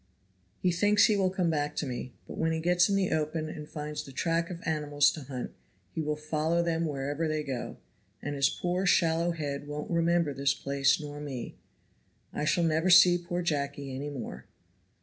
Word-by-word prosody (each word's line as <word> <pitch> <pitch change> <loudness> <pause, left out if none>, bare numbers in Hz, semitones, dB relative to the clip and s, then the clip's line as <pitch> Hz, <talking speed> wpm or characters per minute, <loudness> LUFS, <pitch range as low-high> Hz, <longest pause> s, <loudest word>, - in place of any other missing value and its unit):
"He 180 - +1
thinks 205 +4 +4
he 215 - +3
will 190 -2 +2
come 180 -3 0
back 150 -1 -1
to 150 - -1
me, 125 -1 -5
but - - -7
when 160 0 0
he 160 - -1
gets 175 +3 +3
in 200 - +2
the 195 -2 +1
open 155 0 -1
and 150 -1 -8
finds 150 -1 -5
the 135 - -11
track 165 +4 0
of 175 -2 -6
animals 145 -2 +2
to 150 -3 -8
hunt 130 -2 -5 0.4
he 160 - -2
will 150 0 -1
follow 155 +2 0
them 165 -1 0
wherever 145 +2 -2
they 155 -1 -1
go, 135 -4 -5 0.4
and 145 - -4
his 140 -1 +3
poor 180 +4 -1
shallow 170 -1 +3
head 145 -4 -3
won't 150 +2 -5
remember 170 -2 +2
this 140 +1 +1
place 140 +1 +2
nor 145 -1 -7
me; 135 -5 -6 0.8
I 150 - -2
shall 170 +2 +2
never 165 +2 +2
see 180 0 +8
poor 175 0 -3
Jacky 140 -3 -2
any 140 +3 -4
more!" 140 -4 -7
155 Hz, 195 wpm, -29 LUFS, 145-170 Hz, 0.8 s, see